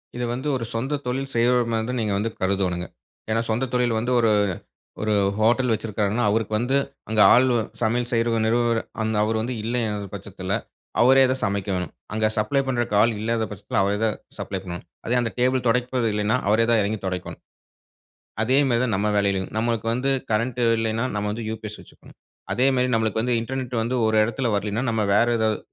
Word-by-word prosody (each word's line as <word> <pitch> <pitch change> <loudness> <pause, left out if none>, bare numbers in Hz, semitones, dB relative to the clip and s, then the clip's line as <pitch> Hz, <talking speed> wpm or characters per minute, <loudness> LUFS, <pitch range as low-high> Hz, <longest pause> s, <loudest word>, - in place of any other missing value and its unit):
இத 125 - -3
வந்து 130 +4 -4
ஒரு 120 -3 -3
சொந்த 135 +6 -2
தொழில் 135 +2 -3
செய்றவர்மாரி 115 -1 +2
தான் 125 0 -1
நீங்க 105 -2 0
வந்து 105 +3 -1
கருதோனுங்க. 95 -2 0 0.4
ஏன்னா, 115 +1 +1
சொந்த 115 +4 +1
தொழில் 120 -2 +1
வந்து 120 +2 -1
ஒரு 115 -2 +3 0.7
ஒரு 110 0 +1 0.3
ஹோட்டல் 120 +3 +3
வச்சிருக்காருனா, 110 0 -1
அவருக்கு 110 0 0
வந்து, 125 +5 +1 0.3
அங்க 110 -1 +1
ஆள் 125 - +6 0.4
சமையல் 120 +2 +1
செய்யுற 115 -1 +1
நிறுவர 120 0 +2 0.2
அந்த 110 0 -1
அவர் 110 +1 0
வந்து 120 +3 -2
இல்லங்குற 110 -3 -2
பட்சத்துல, - - -6 0.5
அவரே 130 +2 +6
தான் 130 0 -1
சமைக்கணும். 100 -2 -2 0.2
அங்க 110 0 +1
சப்ளை 110 +6 +1
பண்றக்கு 120 -4 -1
ஆள் 115 - +3
இல்லாத 115 +1 0
பட்சத்துல, 100 -1 -4
அவரே 100 +1 0
தான், 110 - 0 0.2
சப்ளை 95 - -4
பண்ணணும். 90 -2 -7 0.2
அதே 120 - +1
அந்த 115 -2 -2
டேபிள் 125 0 +2
துடைப்பது 125 0 +1
இல்லன்னா, 105 +4 +1
அவரே 110 +2 +4
தான் 115 -2 +4
இறங்கி 105 +2 -1
துடைக்கணும். 90 -1 -5 1.0
அதே 130 +4 +3
மாதிரி 120 -1 +2
தான் 115 - 0
நம்ப 105 +2 0
வேலையிலயும், 100 -2 0
நமக்கு 115 0 -1
வந்து 125 +3 0 0.2
கரண்ட் 115 +3 0 0.2
இல்லன்னா, 115 +2 0
நம்ம 105 0 -1
வந்து 115 +1 -5
யுபிஎஸ் 110 -1 -6
வச்சுக்கணும். - - -18 0.4
அதேமாரி 130 0 +2
நமக்கு 110 -1 0
வந்து 125 +1 +1
இன்டர்நெட் 125 +1 -4
வந்து 120 +3 -1
ஒரு 110 - +1
இடத்துல 120 +3 -2
வரலனா, 105 +3 -2
நம்ப 110 -1 0
வேற 115 +3 +4
ஏதாவது 110 -2 +1
115 Hz, 175 wpm, -23 LUFS, 105-125 Hz, 1.0 s, ஆள்